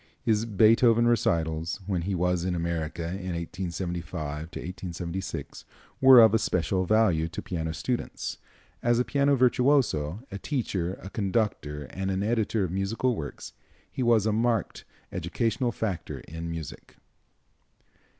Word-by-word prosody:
His 110 -2 +1
Beethoven 115 +2 +5
recitals, 80 -7 +1
when 95 -3 -1
he 95 +3 -2
was 90 0 +1
in 90 -1 -1
America 85 -1 -2
in 90 0 -4
1875 85 -3 -4 0.7
6, - - -7 0.4
were 130 -1 +9
of 110 -2 +6
especial 95 -3 +1
value 90 -6 +3
to 80 - -6
piano 80 -3 -3
students. 120 - -3 0.4
As 120 0 +3
a 125 - +2
piano 140 0 +2
virtuoso, 125 - +2
a 100 - -5
teacher, 95 - -2
a 95 - -8
conductor 95 -8 -1
and 95 0 -3
an 95 +1 -1
editor 110 -1 +1
of 90 - -2
musical 110 +6 0
works, 75 -7 -7 0.4
he - - -4
was 115 -4 +4
a 110 - +2
marked 115 -2 0 0.3
educational 120 +1 -1
factor 100 -8 -4
in 80 +1 -7
music. 80 -3 -7
95 Hz, 130 wpm, -27 LUFS, 85-115 Hz, 0.7 s, were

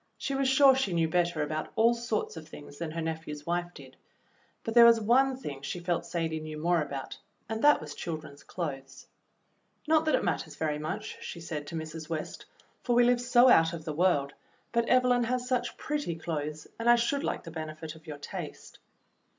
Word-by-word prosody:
She 275 - -3
was 270 -1 +1
sure 270 0 +7
she 235 -9 0
knew 165 -1 +2
better 170 -2 +1
about 155 +1 -3
all 230 +1 +5
sorts 235 -5 -2
of 160 -1 -9
things 145 -1 -12
than 165 -1 -3
her 165 +1 -4
nephew's 160 -2 -5
wife 175 +1 -1
did, - - -13 0.7
but 225 - -3
there 235 0 +9
was 230 -1 +6
one 255 +4 +3
thing 145 - -7
she 175 - -4
felt 175 -1 -2
Sadie 165 -2 -2
knew 155 0 -7
more 170 +2 +2
about 140 -3 -6 0.3
and 220 +1 -4
that 295 0 +6
was 150 -1 -8
children's 155 -3 -6
clothes. 135 -6 -6 0.8
"Not 315 0 +4
that 310 - +3
it - - 0
matters - - -2
very 150 -2 -1
much," 155 +1 -5
she 170 - -6
said 155 -3 -5
to 165 - -6
Mrs. 160 0 -6
West, 160 -2 -5 0.3
"for 240 - 0
we 245 - +6
live 245 0 +3
so 245 +1 +5
out 165 -8 +5
of 160 -2 -7
the 155 - -3
world, 150 -4 +2 0.4
but 235 0 +1
Evelyn 250 -1 +4
has 250 +1 -1
such 250 -1 -1
pretty 295 - -2
clothes, 155 -2 -4
and 230 +1 +1
I 240 - +8
should 240 +4 0
like - - -2
the 165 - -9
benefit 155 0 -6
of 160 0 -17
your 150 -2 -6
taste." 145 - -8
170 Hz, 205 wpm, -29 LUFS, 155-240 Hz, 0.8 s, there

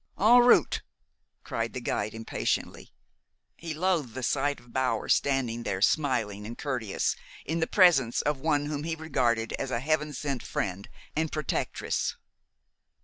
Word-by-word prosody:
"En 230 +5 +7
route!" 245 0 +5 0.6
cried 115 0 -3
the 125 - -3
guide 110 -3 -2
impatiently. 115 0 -3 0.6
He 165 -2 -6
loathed 165 -8 0
the 130 - -4
sight 145 +3 0
of 120 -1 -19
Bower 130 -4 0
standing 130 -4 +1
there, 100 -5 -2
smiling 110 -5 +1
and 115 - -7
courteous, 125 -8 -1 0.3
in 165 +2 -1
the 160 - +1
presence 160 - +4
of 150 -2 0
one 145 0 +1
whom 145 -1 -3
he 165 0 -2
regarded 125 -8 0
as 135 - -2
a 120 - -1
Heaven 150 +3 0
sent 135 -2 -3
friend 95 +1 -3 0.3
and 160 0 0
protectress. 155 -2 -2
135 Hz, 145 wpm, -28 LUFS, 115-155 Hz, 0.6 s, En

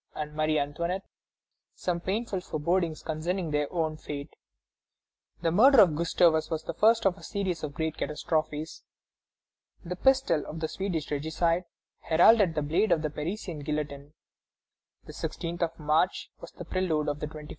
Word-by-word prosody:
and 150 0 -5
Marie 155 0 +1
Antoinette 170 +6 -2 0.7
some 175 -1 -2
painful 195 +1 -2
forebodings 165 0 -1
concerning 165 +2 -2
their 150 -1 0
own 160 -3 -1
fate. 145 -1 -7 1.1
The 165 - +2
murder 255 +9 +7
of 175 -7 +6
Gustavus 165 0 +3
was 160 -1 -2
the - - -5
first 225 +1 +4
of 195 -1 +3
a - - -15
series 185 -5 -2
of 145 -2 -5
great 160 +1 -2
catastrophes. 155 0 -2 1.0
The 180 +1 -4
pistol 265 - +3
of 160 - -6
the 160 - -1
Swedish 170 -5 -3
regicide 165 +4 0 0.3
heralded 175 +2 +5
the 150 - 0
blade 165 +9 +1
of 155 - +3
the 155 - -1
Parisian 165 +2 -4
guillotine. 145 -1 -4 0.9
The - - -10
16th 170 +1 -5
of 165 -1 -1
March 155 +4 +1
was - - -10
the 175 - -9
prelude 165 -4 0
of 145 0 -2
the 150 - -3
21st - - -10
of - - -20
January. 150 -1 -9
160 Hz, 165 wpm, -28 LUFS, 150-180 Hz, 1.1 s, murder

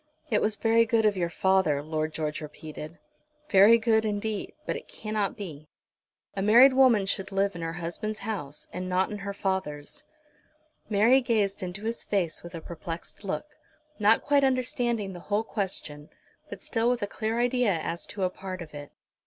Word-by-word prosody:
"It 215 - +3
was 215 0 +1
very 225 +2 +4
good 225 -1 +2
of 210 -1 +3
your 175 -2 -1
father," 185 -5 +2
Lord 155 0 -2
George 155 -1 -3
repeated, 155 +2 -8 0.5
"very 205 +4 +7
good 220 -1 +2
indeed; 210 0 -3
but - - -1
it - - -8
cannot 215 -1 -3
be. 155 -7 -8 0.7
A 195 - -2
married 240 +7 +7
woman 255 -6 +5
should 195 0 -2
live 195 0 +1
in 170 - -6
her 165 0 -3
husband's 175 +6 -4
house 150 -10 -4
and 185 0 -4
not 185 +2 +1
in 210 - -5
her 200 0 -4
father's." 170 -8 -3 0.9
Mary 225 +6 +5
gazed 210 -5 0
into 185 +2 -5
his 230 +1 -2
face 180 -6 -1
with 170 0 -9
a 165 - -6
perplexed 170 +3 -7
look, 195 - -3 0.5
not 215 +2 +4
quite 285 -1 +3
understanding 240 -5 0
the 175 - -8
whole 210 +2 +2
question, 180 -9 -4 0.4
but - - -8
still 230 0 +1
with 245 -3 0
a - - +2
clear 220 +3 -2
idea 245 -3 +2
as 165 +2 -4
to 200 -2 -4
a 180 - +1
part 185 -1 -6
of 155 - -15
it. 145 -1 -9
200 Hz, 180 wpm, -27 LUFS, 170-225 Hz, 0.9 s, very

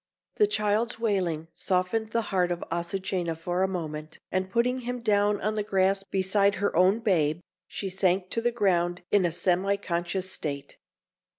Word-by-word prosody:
The 420 - +5
child's 215 - 0
wailing 185 -8 -1
softened 190 +4 0
the 230 +1 0
heart 180 -2 +2
of 175 - -3
Azucena 170 0 -2
for 175 +2 -2
a 190 - +3
moment, 155 -4 -5
and 185 0 -1
putting 245 +5 +1
him 245 0 -4
down 205 -2 +2
on 215 - 0
the 215 - -1
grass 195 -1 +2
beside 195 +1 +1
her 200 - -1
own 185 +6 +4
babe, 165 -7 +2 0.3
she 200 - -4
sank 185 0 +1
to 230 - 0
the 240 +1 +1
ground 180 -6 +1
in 200 -3 +4
a 170 - +1
semi 180 +3 +1
conscious 180 0 -2
state. 140 -4 -5
190 Hz, 170 wpm, -27 LUFS, 175-210 Hz, 0.3 s, The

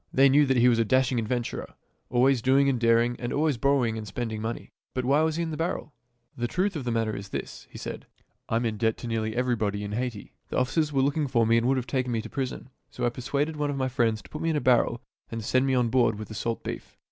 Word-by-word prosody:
They 135 +1 +5
knew 145 +1 +5
that 130 -1 +2
he 120 +1 +5
was 120 -2 +4
a - - +4
dashing 130 +2 +2
adventurer, 120 +1 -3 0.3
always 125 +1 +3
doing 135 +3 +4
and 130 -3 +1
daring, 115 +1 +3
and 120 -1 -3
always 150 -2 +1
borrowing 125 -4 +1
and 105 - -7
spending 110 +1 -4
money. 115 +1 -5 0.2
But 130 -1 -1
why 140 +4 +4
was 160 -1 +1
he 170 - -1
in 165 - -3
the 155 - -4
barrel.'' 165 -3 -3 0.2
" 120 0 -46
The 120 - 0
truth 185 +8 0
of 140 -5 -4
the 120 - -1
matter 115 -2 0
is 100 0 -7
this," - - -6
he - - -11
said; - - -7 0.2
" - - -47
I - - 0
am 120 +1 +1
in 110 -2 -1
debt 110 +1 +1
to 115 -2 -4
almost 110 0 -2
everybody 110 -5 0
in 100 - -5
Haiti. 120 -1 -4 0.2
The - - -2
officers 150 +4 +1
were 135 -2 +2
looking 145 +2 +1
for 115 -3 +2
me 115 +1 +4
and 115 +1 +2
would 135 0 +3
have 125 - -2
taken 125 0 -1
me 115 -2 -1
to - - -8
prison. 135 -1 -4 0.2
So 125 - -3
I - - +3
persuaded 140 +5 -2
one 145 -1 0
of 140 - -2
my 130 -1 0
friends 115 -5 0
to 90 - -15
put - - -6
me 165 - 0
in 160 - +1
a - - +2
barrel 120 -2 +2 0.3
and 115 -1 -5
send 130 +3 +2
me 135 - +2
on 125 -2 +2
board 115 -3 +3
with 110 - -7
the - - -7
salt 115 +2 -3
beef. - - -7
125 Hz, 280 wpm, -27 LUFS, 115-135 Hz, 0.3 s, They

